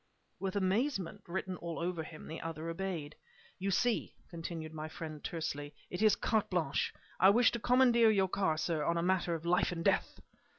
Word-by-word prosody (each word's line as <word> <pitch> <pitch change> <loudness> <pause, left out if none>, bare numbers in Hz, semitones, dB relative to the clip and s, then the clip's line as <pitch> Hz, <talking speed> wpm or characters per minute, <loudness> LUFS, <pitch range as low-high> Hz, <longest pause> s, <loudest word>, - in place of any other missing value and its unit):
With 195 0 -3
amazement 200 - 0
written 185 +1 -3
all 170 -1 -5
over 170 -1 -2
him, 155 0 -9
the 160 - -6
other 165 0 -5
obeyed. 165 -4 -3 0.5
"You 195 +1 -1
see," 230 +5 +1 0.2
continued 165 -2 -5
my 155 0 -5
friend, 155 -4 -7
tersely 145 -3 -4 0.2
"it 180 - -3
is 215 -1 +6
carte 220 -2 0
blanche. 165 -7 0 0.3
I 190 - +8
wish 235 +4 +5
to 235 - -3
commandeer 245 -1 +5
your 195 -3 +3
car, 185 -4 +1
sir, 160 -1 0
on 170 +2 +1
a 170 - 0
matter 180 -2 +1
of 165 0 -7
life 175 +1 +2
and 165 -1 -4
death!". - - +1
175 Hz, 185 wpm, -33 LUFS, 160-195 Hz, 0.5 s, I